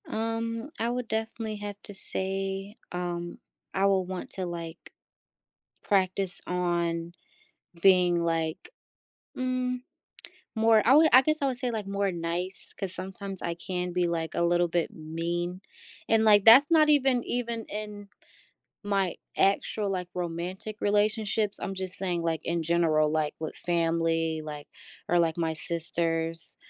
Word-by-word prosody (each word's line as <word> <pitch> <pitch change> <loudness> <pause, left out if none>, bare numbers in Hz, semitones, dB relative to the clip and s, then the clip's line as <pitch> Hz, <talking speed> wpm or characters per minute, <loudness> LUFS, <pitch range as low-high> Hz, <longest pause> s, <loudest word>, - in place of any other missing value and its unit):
Um, 230 +3 -3
I 230 - 0
would 245 0 -3
definitely 220 0 -3
have 205 0 -6
to 205 - -7
say, 195 +1 -3 0.2
um, 175 -1 -4 0.3
I 195 - +2
will 195 -2 +3
want 185 0 -6
to, 185 - -3
like, 170 -1 -7 0.9
practice 190 -1 +1
on 170 -1 -1 0.7
being, 180 -3 +5
like 165 - -2 0.7
mm, 255 0 -1 0.8
more 220 0 +5
I 250 - +6
would, 315 +1 +7
I 255 - +10
guess 310 +3 0
I 280 - +2
would 260 -2 -1
say, 250 -1 -1
like, 220 -3 -3
more 200 0 0
nice 175 +2 -4
'cause 190 -2 -3
sometimes 190 0 -6
I 170 - -2
can 180 +1 -3
be, 180 -1 +1
like, 165 -1 -2
a - - 0
little 175 0 +2
bit 170 0 0
mean, 170 +3 -3 0.5
and, 225 0 +4
like, 205 -2 +6
that's 265 +7 +9
not 310 -2 +6
even 265 -4 +4
even 235 -2 -2
in 210 -1 -6 0.8
my 195 -3 0 0.2
actual, 200 +1 +1
like, 180 -2 -3
romantic 180 +4 -4
relationships, 210 0 +1
I'm 195 - -3
just 185 -1 -3
saying, 180 -3 -1
like, 165 -1 -1
in 170 0 -1
general, 160 -2 +2
like, 155 -1 0
with 160 - -4
family, 165 -1 0
like 150 -1 -8 0.4
or, 175 - +4
like, 165 -2 +2
my 165 -2 0
sisters 165 0 -2
185 Hz, 145 wpm, -28 LUFS, 170-215 Hz, 0.9 s, I